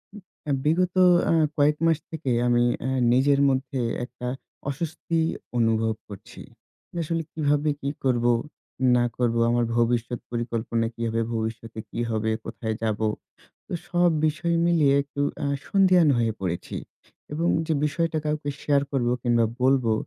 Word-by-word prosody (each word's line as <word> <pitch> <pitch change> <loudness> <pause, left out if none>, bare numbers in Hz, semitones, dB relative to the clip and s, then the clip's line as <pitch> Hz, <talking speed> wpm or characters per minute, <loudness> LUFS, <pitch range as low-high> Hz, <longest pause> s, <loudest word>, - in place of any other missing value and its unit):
উ - - -8 0.3
আ - - +2
বিগত 175 +4 +1 0.4
আ - - +4 0.2
কয়েক 150 +1 +3
মাস 165 -2 +4
থেকে 155 -5 -3 0.2
আমি 120 0 +3 0.2
আ - - 0 0.2
নিজের 140 +2 +3
মধ্যে 130 0 -1 0.3
একটা 125 0 -8 0.4
অস্বস্তি 165 +3 -2 0.4
অনুভব 115 -1 +2 0.2
করছি। 100 -2 -11 0.6
আসলে 165 +1 -2
কীভাবে 150 -1 +1
কি 140 - -2
করবো 120 -2 +2 0.6
না 120 - +3
করবো, 115 -2 +1
আমার 120 0 +2
ভবিষ্যৎ 120 0 +1
পরিকল্পনা 115 -1 -1
কী 115 - -9
হবে, 115 0 0
ভবিষ্যতে 110 0 -4
কি - - -6
হবে, 110 0 0
কোথায় 110 -1 -4
যাবো। 110 0 0 0.6
তো - - -9 0.2
সব 175 0 +3 0.2
বিষয় 170 +2 0
মিলিয়ে 155 -5 +4
একটু 140 0 -8 0.2
আ - - 0 0.2
সন্ধিয়ান 185 -4 +5
হয়ে 115 -1 +1
পড়েছি। 85 -2 -3 0.6
এবং 165 +3 0 0.2
যে 160 - 0
বিষয়টা 160 +1 0
কাউকে 150 -1 -2
শেয়ার 140 -1 +2
করবো 120 -3 +1
কিংবা 120 -2 +3 0.2
বলবো 130 -3 +3
130 Hz, 145 wpm, -25 LUFS, 115-155 Hz, 0.6 s, সন্ধিয়ান